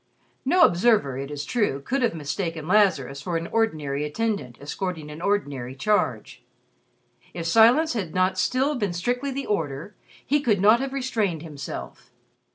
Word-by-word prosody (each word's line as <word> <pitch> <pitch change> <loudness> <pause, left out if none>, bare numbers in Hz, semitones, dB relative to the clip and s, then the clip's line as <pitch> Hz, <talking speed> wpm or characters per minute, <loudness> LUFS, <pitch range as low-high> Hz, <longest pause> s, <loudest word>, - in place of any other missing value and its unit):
No 350 +6 +5
observer, 175 - +3
it 135 0 -5
is 145 -1 -5
true, 205 - 0
could 255 - -2
have 235 -7 +1
mistaken 160 +1 -4
Lazarus 170 -10 +2
for 170 +3 -2
an 165 - -4
ordinary 155 -10 -1
attendant 200 - -2
escorting 155 +1 -5
an 150 +2 -9
ordinary 140 -11 -1
charge. 130 - -1 0.9
If 170 -1 -4
silence 235 - +5
had 195 -9 -3
not 185 0 +2
still 265 +7 +1
been 205 -9 -2
strictly 245 +10 -1
the 275 +1 -4
order, 160 -1 -3 0.3
he 290 +1 +2
could 215 -8 +2
not 215 +4 +5
have 270 0 -3
restrained 220 - -1
himself. 140 -5 -8
185 Hz, 155 wpm, -24 LUFS, 150-230 Hz, 0.9 s, No